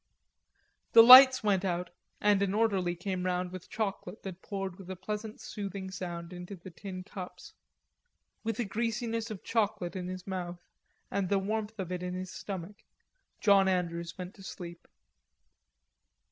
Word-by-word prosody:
The 230 - +11
lights 260 +1 +11
went 200 -3 +2
out, 180 -1 -2 0.3
and 205 -1 +3
an 200 0 +1
orderly 195 -6 +1
came 180 +1 -3
round 180 0 -1
with 185 -1 -9
chocolate 215 -1 -4
that 190 -1 -7
poured 195 -2 -5
with 190 -1 -11
a 190 - -4
pleasant 210 +3 -5
soothing 195 -2 -6
sound 175 -2 -6
into 180 +2 -7
the 185 +1 -11
tin 185 +1 -7
cups. 185 -1 -9 0.9
With 225 0 -2
a 240 - +1
greasiness 230 +2 -2
of 215 -4 -7
chocolate 205 -5 -1
in 180 -1 -4
his 185 0 -6
mouth 180 -2 -4 0.5
and 195 -2 -1
the 200 - +3
warmth 215 +2 -2
of 185 -3 -4
it 180 -1 -3
in 180 0 -3
his 185 0 -5
stomach, 195 0 -6 0.6
John 200 -2 +5
Andrews 170 -2 -1
went 180 +1 -6
to 195 - -16
sleep. 175 -2 -9
190 Hz, 160 wpm, -31 LUFS, 180-210 Hz, 0.9 s, The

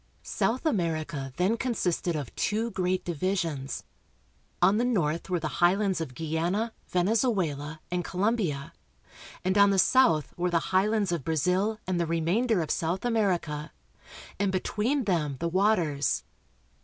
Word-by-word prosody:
South 250 +7 -1
America 160 - -1
then 185 +6 +2
consisted 185 -8 -1
of 145 -6 -5
two 225 +3 0
great 185 -1 -1
divisions. 170 -5 -2 0.8
On 200 - +4
the 235 - +2
north 175 -9 0
were 180 -1 +1
the 155 - -2
highlands 190 +1 +3
of 130 -6 -5
Guiana, 170 - -1
Venezuela, 175 - 0
and 180 0 -1
Co 180 - -8
lombia, 185 -9 0 0.7
and 190 +2 +2
on 200 0 +7
the 195 - +2
south 180 - +3
were 180 +1 0
the 170 -1 0
highlands 205 0 +2
of 170 -5 -2
Brazil 180 - +1
and 185 -1 -1
the 170 - 0
remainder 175 +5 +1
of 155 - -4
South 170 +6 -1
America, 180 -10 0 0.7
and 200 -1 +1
between 220 +8 0
them 160 - 0
the 170 - -1
waters. 170 -7 +1
180 Hz, 145 wpm, -28 LUFS, 160-210 Hz, 0.8 s, on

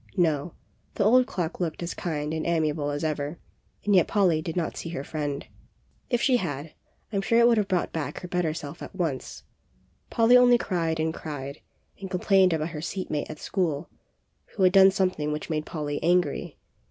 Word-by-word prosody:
No, 160 -2 +1 0.4
the - - +1
old 250 +5 +5
clock 175 -2 -3
looked 170 -1 -2
as 170 - -3
kind 150 -3 -3
and 160 -1 -2
ami 160 -2 +2
able 145 -1 -2
as 145 +2 -3
ever, 150 0 -2 0.5
and 205 - +3
yet 180 - +5
Polly 180 -7 +2
did 160 0 -5
not 170 - -1
see 165 - -5
her 165 -5 -4
friend. 145 -2 -4 0.6
If 240 -2 +1
she 255 -3 +4
had, 150 - -4 0.4
I - - 0
am - - +1
sure 230 +4 +2
it 235 0 +6
would 235 -2 +4
have 205 - 0
brought 185 -3 -1
back 160 -3 -4
her 180 - -6
better 175 -2 0
self 155 +1 -7
at - - -9
once. 160 -8 -3 0.7
Polly 230 +2 +5
only 245 -1 +7
cried 165 -7 -1
and 160 0 0
cried, 140 -3 -7 0.4
and 195 -1 -6
complained 190 0 +3
about 160 0 -1
her 155 -2 -6
seat 185 +3 -4
mate 150 - -2
at - - -7
school, 165 -3 -2 0.6
who 195 - +1
had 185 0 +5
done 195 -1 +8
some 190 -1 +1
thing 150 -3 -3
which 150 +2 -4
made 155 -1 -2
Polly 145 -2 -3
angry. 175 -3 +1
170 Hz, 205 wpm, -26 LUFS, 150-190 Hz, 0.7 s, done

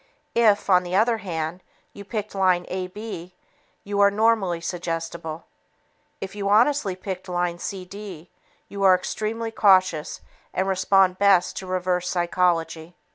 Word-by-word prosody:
If, 220 -3 +3
on 185 -2 +5
the 180 0 -4
other 225 +3 +3
hand, 170 -2 -4 0.3
you 200 - -10
picked 210 0 -5
line 185 -2 +2
AB, 185 -1 -6 0.5
you 200 0 -3
are 200 0 +6
normally 205 -4 +1
suggestible. 165 -1 -5 0.7
If 195 - -6
you 200 -1 -3
honestly 225 -1 +3
picked 185 0 -7
line 175 -1 -1
CD, 185 -2 -8 0.4
you 200 - -7
are 190 -1 +6
extremely 220 +4 -3
cautious 185 -7 +2 0.3
and 190 - 0
respond 190 -1 +3
best 195 -3 +4
to 190 - -6
"reverse 180 -1 -1
psychology." 175 -2 0
185 Hz, 130 wpm, -24 LUFS, 175-200 Hz, 0.7 s, are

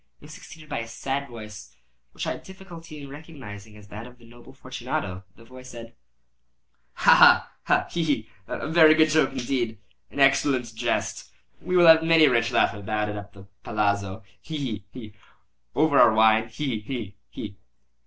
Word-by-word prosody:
It - - -17
was 155 - -12
succeeded 155 0 -13
by 145 - -4
a 115 - -6
sad 135 +4 -4
voice, 105 - -11 0.4
which - - -6
I - - -1
had - - -6
difficulty 170 -5 -12
in 140 - -10
recognising 120 -9 -11
as 100 -1 -16
that 110 +3 -9
of 125 0 -16
the 120 - -19
noble 120 +1 -16
Fortunato. 95 +1 -6
The 115 - -18
voice 130 +1 -13
said— 115 -1 -11 1.0
"Ha! - - +5
ha! - - +6 0.3
ha!—he! 170 - -4
he!—a 115 -5 -4
very 160 -1 +6
good 155 0 +4
joke 155 -3 +2
indeed—an 120 -1 -5
excellent 135 -3 +2
jest. 110 - -3 0.3
We 180 - -1
will 175 - +6
have 160 -1 +8
many 165 -1 +5
a 140 - +3
rich 115 -1 +1
laugh - - +2
about 105 +1 -3
it 105 - -5
at 100 0 -9
the 100 -2 -14 0.2
palazzo—he! 100 +7 -3
he! 110 -9 -5
he!—over 130 +6 -3
our 110 - +6
wine—he! 110 +3 +2
he! 105 -3 -7
he!" 100 -2 -8
120 Hz, 165 wpm, -25 LUFS, 105-150 Hz, 1.0 s, have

